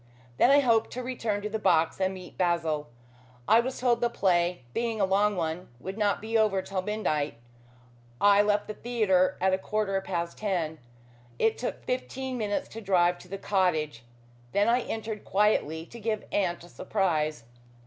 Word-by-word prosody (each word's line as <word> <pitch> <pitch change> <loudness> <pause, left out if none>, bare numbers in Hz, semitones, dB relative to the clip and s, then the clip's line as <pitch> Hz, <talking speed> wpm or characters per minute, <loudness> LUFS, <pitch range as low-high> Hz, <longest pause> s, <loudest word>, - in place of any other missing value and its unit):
Then - - +5
I 285 +1 +6
hoped 230 -4 +3
to 255 - -4
return 225 -5 -2
to 210 - -2
the 220 +1 -3
box 170 -2 +2
and 190 0 +2
meet 185 -1 -11
Basil. 165 -6 0 0.6
I 225 - +6
was 255 +2 -2
told 245 -2 +2
the 240 - +2
play, 175 - +1
being 230 -2 -1
a 195 - +4
long 200 +2 +2
one, 165 0 -3
would 190 +8 -6
not 205 -2 +1
be 225 +1 -4
over 210 -4 +3
till 195 -1 -3
midnight. 155 - -1 0.8
I 205 0 +6
left 205 0 +1
the 215 - -4
theatre 205 -6 +1
at 190 +1 +2
a 190 - +1
quarter 195 -1 -1
past 170 -3 -4
ten. 170 -7 -1 0.6
It 225 - +2
took 245 - -4
fifteen 255 +1 -3
minutes 205 -2 -1
to 225 - -8
drive 180 -3 +2
to - - -14
the 195 +2 -5
cottage. 160 - 0 0.5
Then 205 +1 +3
I 240 +2 +3
entered 220 -2 -5
quietly 180 -6 +1
to 235 - -11
give 215 -1 -2
aunt 175 -4 0
a 175 - -13
surprise." 155 - -1
200 Hz, 180 wpm, -28 LUFS, 175-220 Hz, 0.8 s, I